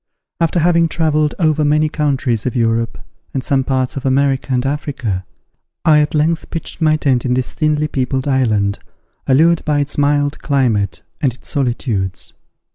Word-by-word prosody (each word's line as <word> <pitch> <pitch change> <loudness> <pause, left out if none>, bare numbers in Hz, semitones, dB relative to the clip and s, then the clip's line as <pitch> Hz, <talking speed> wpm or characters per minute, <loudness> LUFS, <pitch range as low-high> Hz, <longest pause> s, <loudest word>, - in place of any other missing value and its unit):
After 165 +1 +1
having 170 0 +3
travelled 155 -2 +1
over 155 -3 +2
many 150 +1 +3
countries 135 -7 -1
of 130 - -3
Europe, 115 -1 0 0.4
and 130 - -1
some 135 -2 +1
parts 130 -1 -1
of 135 - -5
America 135 0 +1
and 125 0 +1
Africa, 135 -9 -3 0.6
I 155 -2 +6
at 150 +1 0
length 160 +2 0
pitched 165 0 -6
my 155 -1 +4
tent 130 -5 +1
in 125 -1 0
this 130 -1 -2
thinly 150 -1 +1
peopled 130 -1 -2
island, 110 -7 +1 0.5
allured 160 +5 +4
by 150 -1 +1
its 145 0 -1
mild 145 0 +1
climate 120 -9 0 0.2
and 130 -5 +1
its - - -12
solitudes. 115 - -2
140 Hz, 160 wpm, -17 LUFS, 125-150 Hz, 0.6 s, I